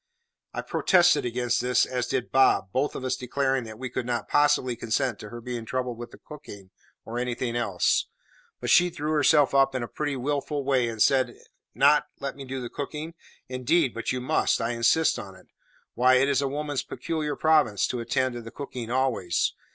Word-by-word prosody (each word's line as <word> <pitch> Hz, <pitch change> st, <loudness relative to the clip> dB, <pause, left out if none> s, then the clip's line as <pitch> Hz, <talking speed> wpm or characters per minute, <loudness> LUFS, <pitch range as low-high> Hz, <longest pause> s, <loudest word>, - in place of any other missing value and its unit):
I -, -, -4 dB
protested 175 Hz, -7 st, +3 dB
against 120 Hz, 0 st, 0 dB
this, 125 Hz, 0 st, +2 dB
as 125 Hz, -1 st, -3 dB
did 130 Hz, -2 st, -2 dB
Bob, 130 Hz, -7 st, +3 dB
both 135 Hz, +6 st, -1 dB
of 130 Hz, -, -5 dB
us 130 Hz, -, 0 dB
declaring 130 Hz, 0 st, -1 dB
that 110 Hz, -1 st, -9 dB
we 130 Hz, +2 st, -5 dB
could 125 Hz, 0 st, -4 dB
not 120 Hz, -3 st, -2 dB
possibly 130 Hz, -4 st, +2 dB
consent 115 Hz, +1 st, -1 dB
to 105 Hz, -, -9 dB
her 120 Hz, +2 st, -8 dB
being 120 Hz, -1 st, -5 dB
troubled 125 Hz, 0 st, -3 dB
with 120 Hz, -, -7 dB
the -, -, -14 dB
cooking 100 Hz, -11 st, -12 dB, 0.3 s
or 115 Hz, +2 st, -4 dB
anything 125 Hz, -1 st, -2 dB
else; 120 Hz, -1 st, +1 dB, 0.5 s
but -, -, -1 dB
she 180 Hz, 0 st, +6 dB
drew 150 Hz, -2 st, -4 dB
herself 150 Hz, -1 st, +4 dB
up 135 Hz, -1 st, +3 dB
in 130 Hz, -, -1 dB
a -, -, -4 dB
pretty 145 Hz, +1 st, -3 dB
wilful 145 Hz, +2 st, -2 dB
way 130 Hz, -3 st, +2 dB
and 110 Hz, -2 st, +1 dB
said, 130 Hz, -2 st, +2 dB, 0.4 s
"Not 145 Hz, +2 st, +4 dB
let 140 Hz, 0 st, -4 dB
me 140 Hz, -1 st, -9 dB
do 130 Hz, 0 st, -5 dB
the 125 Hz, -, -5 dB
cooking? 150 Hz, +5 st, -6 dB, 0.3 s
Indeed, 130 Hz, +2 st, +1 dB
but 115 Hz, -, -3 dB
you 130 Hz, -, -2 dB
must; 155 Hz, +5 st, +1 dB
I 115 Hz, 0 st, -1 dB
insist 120 Hz, +7 st, +2 dB
on 95 Hz, -1 st, -9 dB
it. -, -, -18 dB, 0.5 s
Why, 130 Hz, +1 st, +4 dB
it 130 Hz, +2 st, +4 dB
is 140 Hz, 0 st, +1 dB
woman's 145 Hz, 0 st, -2 dB
peculiar 155 Hz, -3 st, -4 dB
province 150 Hz, -10 st, +3 dB
to 125 Hz, -, -2 dB
attend 130 Hz, +2 st, 0 dB
to 120 Hz, -, -6 dB
the 115 Hz, -, -9 dB
cooking 125 Hz, -3 st, -7 dB
always. 120 Hz, -9 st, 0 dB
130 Hz, 200 wpm, -26 LUFS, 120-140 Hz, 0.5 s, she